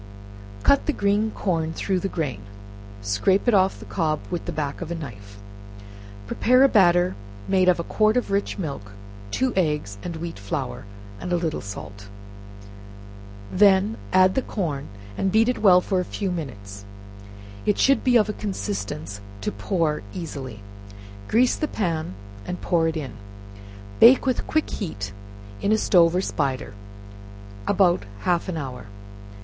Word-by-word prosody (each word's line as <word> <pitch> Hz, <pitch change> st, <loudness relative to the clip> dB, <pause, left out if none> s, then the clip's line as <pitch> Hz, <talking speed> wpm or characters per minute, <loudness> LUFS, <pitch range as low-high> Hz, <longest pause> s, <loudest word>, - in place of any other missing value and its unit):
Cut 280 Hz, -, +4 dB
the 300 Hz, -, +2 dB
green 205 Hz, +1 st, +1 dB
corn 165 Hz, -6 st, -1 dB
through 190 Hz, +2 st, -1 dB
the 195 Hz, -, -2 dB
grain, 140 Hz, -, -3 dB, 0.6 s
and 100 Hz, -, -14 dB
scrape 105 Hz, -, +2 dB
it 240 Hz, -, +4 dB
off 190 Hz, -1 st, +3 dB
the -, -, -10 dB
cob 155 Hz, -4 st, -1 dB
with 175 Hz, -, -3 dB
the -, -, -3 dB
back 145 Hz, -2 st, -3 dB
of 170 Hz, -, -5 dB
a 170 Hz, -, -3 dB
knife; 100 Hz, -10 st, -9 dB, 0.9 s
prepare 255 Hz, -, +3 dB
a -, -, +8 dB
batter 180 Hz, -5 st, +4 dB, 0.3 s
made 185 Hz, -1 st, +4 dB
of 175 Hz, -, +3 dB
a -, -, -1 dB
quart 215 Hz, +6 st, +2 dB
of 245 Hz, -, -1 dB
rich 200 Hz, 0 st, 0 dB
milk, 140 Hz, -, -5 dB, 0.4 s
two 255 Hz, -, 0 dB
eggs, 150 Hz, -, -1 dB
and 170 Hz, -, -5 dB
wheat 165 Hz, -7 st, -6 dB
flour, 100 Hz, 0 st, -4 dB, 0.3 s
and 180 Hz, -, -5 dB
a -, -, +3 dB
little 165 Hz, -3 st, -1 dB
salt; 100 Hz, 0 st, -9 dB, 1.4 s
then 200 Hz, +2 st, +4 dB, 0.2 s
add 185 Hz, 0 st, +5 dB
the 265 Hz, -, +1 dB
corn, 155 Hz, -, -3 dB, 0.3 s
and 195 Hz, -, +1 dB
beat 220 Hz, +3 st, +4 dB
it 250 Hz, -, 0 dB
well 185 Hz, -4 st, +7 dB
for 190 Hz, 0 st, 0 dB
a -, -, 0 dB, 0.2 s
few 195 Hz, -3 st, 0 dB
minutes: 100 Hz, -, -6 dB, 0.8 s
it 210 Hz, -, +3 dB
should 275 Hz, -3 st, +3 dB
be 250 Hz, -2 st, +5 dB
of 215 Hz, -, +3 dB
a 210 Hz, -, -2 dB
consistence 160 Hz, -, -4 dB, 0.2 s
to -, -, -2 dB
pour 155 Hz, -, -1 dB
easily; 135 Hz, -, -6 dB, 0.7 s
grease 245 Hz, +3 st, +3 dB
the 305 Hz, -, -2 dB
pan, 165 Hz, -, -2 dB, 0.3 s
and 180 Hz, -, -4 dB
pour 165 Hz, -2 st, +1 dB
it 160 Hz, 0 st, -2 dB
in; 135 Hz, -7 st, -5 dB, 0.9 s
bake 250 Hz, +4 st, +8 dB
with 255 Hz, -2 st, 0 dB
quick 310 Hz, 0 st, +1 dB
heat 100 Hz, -, -5 dB, 0.5 s
in 200 Hz, -, +1 dB
a 220 Hz, -, +4 dB
stove 175 Hz, -5 st, +4 dB
or 185 Hz, -, +2 dB
spider, 135 Hz, -, -2 dB, 0.9 s
about 180 Hz, -3 st, +3 dB, 0.2 s
half 175 Hz, -, 0 dB
an 170 Hz, -, -3 dB
hour. 125 Hz, -7 st, -6 dB
175 Hz, 160 wpm, -24 LUFS, 140-200 Hz, 1.4 s, a